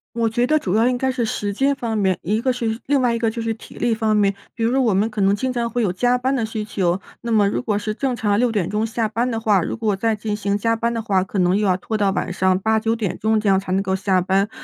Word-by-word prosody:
我 230 -1 +1
觉 240 +2 0
得 310 - +3
主 190 -11 -2
要 225 +3 +3
应 250 -1 +1
该 265 +1 0
是 250 -2 -2
时 205 -2 -2
间 275 +5 +1
方 235 -4 -3
面， 190 -4 +1
一 215 +5 0
个 260 - +1
是 230 -2 -2
另 285 -1 +3
外 245 -2 +2
一 230 - -1
个 230 -1 +1
就 230 - -6
是 225 0 -1
体 220 - -14
力 235 - +1
方 220 -1 +1
面。 200 -1 +3 0.2
比 230 - -3
如 230 - +2
说 265 +1 +2
我 225 -5 +2
们 200 +3 +2
可 210 -2 -4
能 195 +1 +3
经 255 +3 -2
常 235 -1 -1
会 240 +1 -1
有 185 -4 0
加 245 +6 +2
班 260 +2 0
的 235 - 0
需 220 -1 -4
求， 185 -3 0 0.2
那 235 -1 -4
么 210 -2 +4
如 205 - -1
果 215 -4 -1
是 210 +1 -3
正 260 +2 -1
常 210 -3 +1
6 245 -1 +2
点 200 -6 0
钟 210 +1 -1
下 225 0 -1
班 230 +4 -1
的 225 - -2
话， 210 -5 +2
如 - - -3
果 220 -3 0
再 225 +3 0
进 210 0 -3
行 200 -1 -1
加 230 +2 +1
班 235 +1 -1
的 230 - -2
话， 190 -4 +1
可 195 - -6
能 180 +1 +3
又 205 -1 +1
要 185 - +2
拖 220 +4 -4
到 205 -2 +2
晚 185 - -2
上 185 0 +2
8、9 220 +2 +1
点 215 -6 -3
钟 220 0 +2
这 210 - -2
样 190 -1 +4
才 190 -1 -6
能 195 - +1
够 190 -1 0
下 190 -1 +1
班。 195 +3 +1
220 Hz, 330 characters per minute, -21 LUFS, 200-235 Hz, 0.2 s, 么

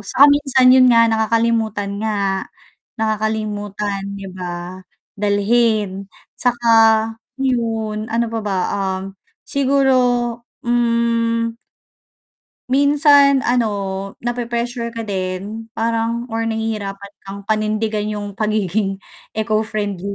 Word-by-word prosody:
saka 235 +7 +4
minsan 265 -3 +4
'yon 260 0 +7
nga 230 -1 +6
nakakalimutan 220 -2 0
nga, 200 -3 -1 0.5
nakakalimutan 210 -2 -2
'di 195 -1 -7
ba? 180 +1 -6 0.3
Dalhin 205 -1 +1 0.3
saka 240 -1 -1 0.7
'yon, 225 -4 -1
ano 235 +1 +1
pa 225 0 -3
ba 200 -2 -1 0.2
um, 190 -1 -2 0.4
siguro, 275 -1 +2 0.7
mm 230 -1 +1 1.2
Minsan, 285 0 +5
ano, 240 -1 +2 0.6
na 240 - 0
pre-pressure 235 0 -3
ka 230 - -4
din 200 +2 -4
parang 230 +1 -1
or 225 0 -2
nahihirapan 210 -3 -3 0.2
kang 200 +1 -7
panindigan 215 0 -1
'yong 205 -2 -5
pagiging 205 -2 -1 0.3
eco-friendly 215 -3 -2
220 Hz, 95 wpm, -19 LUFS, 205-235 Hz, 1.2 s, yon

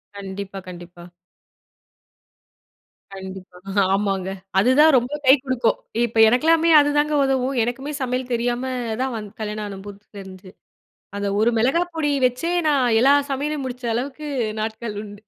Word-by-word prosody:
கண்டிப்பா 195 0 -7
கண்டிப்பா. 175 -1 -11 2.1
கண்டிப்பா 190 -1 -10 0.4
ஆமாங்க. 195 -2 -1 0.3
அதுதான் 285 +8 +5
ரொம்ப 245 +2 -1
கை 260 - +8
கொடுக்கும், 255 -4 0 0.3
இப்ப 230 -1 -6
எனக்கெல்லாமே 320 +8 +3
அதுதாங்க 295 +1 +1
உதவும், 270 0 0
எனக்குமே 265 +5 -4
சமையல் 255 0 -2
தெரியாம 240 +1 -1 0.4
தான், 265 0 -1
வ - - -3 0.2
கல்யாணம் 210 0 -4
ஆன 195 -1 -8
புதுசு 205 0 -12
தெரிஞ்சு, 190 -1 -11 0.7
அது 200 - -2
ஒரு 225 - +4
மிளகாய் 245 +4 +2
பொடி 350 - -22
பொடி 295 -2 0
வச்சே, 255 +8 -1 0.2
நான் 280 -4 +2 0.2
எல்லா 275 +3 +6 0.2
சமையலயும், 290 +1 -2
முடிச்ச 250 -1 -6
அளவுக்கு 280 +4 -5 0.3
நாட்கள் 220 -1 -5
உண்டு, 205 -1 -12
240 Hz, 135 wpm, -22 LUFS, 200-270 Hz, 2.1 s, கை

